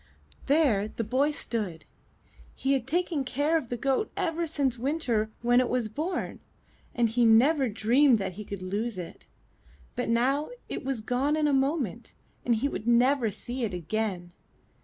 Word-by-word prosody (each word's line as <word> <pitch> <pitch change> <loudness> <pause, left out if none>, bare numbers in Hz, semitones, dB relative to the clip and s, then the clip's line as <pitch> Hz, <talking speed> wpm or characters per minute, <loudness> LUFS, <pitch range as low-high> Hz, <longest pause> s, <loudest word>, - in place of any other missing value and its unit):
*' - - -25
There 270 -9 +3
the 230 - -4
boy 260 +7 +1
stood. 210 - -4 0.7
He 270 +1 0
had 265 -2 -1
taken 335 -1 0
care 285 +5 0
of 295 -8 -1
the 245 - -2
goat 275 - 0
ever 335 0 -1
since 280 -5 0
winter 245 -4 -1
when 245 +1 +4
it 255 - +1
was 245 -3 0
born, 315 - -3 0.6
and 240 -1 +3
he 230 +2 -1
had 230 - +6
never 265 +4 +4
dreamed 240 +5 +4
that 195 -2 -3
he 210 +4 -7
could 200 -2 -7
lose 205 +3 -3
it; 175 -2 -8 0.7
but - - -2
now 265 +6 +1 0.2
it - - -5
was 265 -4 -2
gone 255 +7 0
in 305 -1 +2
a 290 - +2
moment 265 - -1 0.3
and 240 - +2
he 240 +6 0
would 225 -5 -5
never 245 0 +4
see 245 +5 -5
it 205 -5 -2
again. 180 0 -3
245 Hz, 180 wpm, -28 LUFS, 220-280 Hz, 0.7 s, had